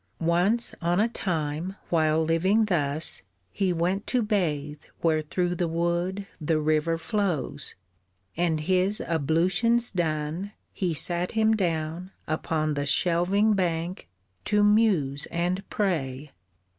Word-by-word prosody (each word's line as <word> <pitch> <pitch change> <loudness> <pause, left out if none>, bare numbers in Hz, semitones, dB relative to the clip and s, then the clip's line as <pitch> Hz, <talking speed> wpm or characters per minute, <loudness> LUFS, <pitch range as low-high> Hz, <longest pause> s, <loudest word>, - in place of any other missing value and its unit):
Once 180 +8 +2
on 175 +2 +1
a 220 - +3
time, 165 -4 -3
while 160 -1 +2
living 190 +7 +2
thus, 155 -5 -1 0.3
he 190 - 0
went 180 +4 -1
To 250 -2 +1
bathe 150 -8 -1 0.2
where 160 -2 +2
through 175 +3 -1
the 175 -1 -1
wood 175 +4 -1 0.2
the 155 +1 +1
river 155 +2 +1
flows: 180 - -2 0.6
And 165 -2 0
his 185 +5 +2
ablutions 180 - +2
done, 165 +2 -2 0.2
he 175 -4 -1
sat 175 +3 +1
him 220 0 +3
down 170 -2 -2 0.2
Upon 155 0 -1
the 145 0 -2
shelving 180 +8 +2
bank 175 - -2 0.4
to 210 0 +2
muse 200 -10 +2
and 175 +3 -1
pray. 150 -8 -2
170 Hz, 120 wpm, -26 LUFS, 155-195 Hz, 0.6 s, a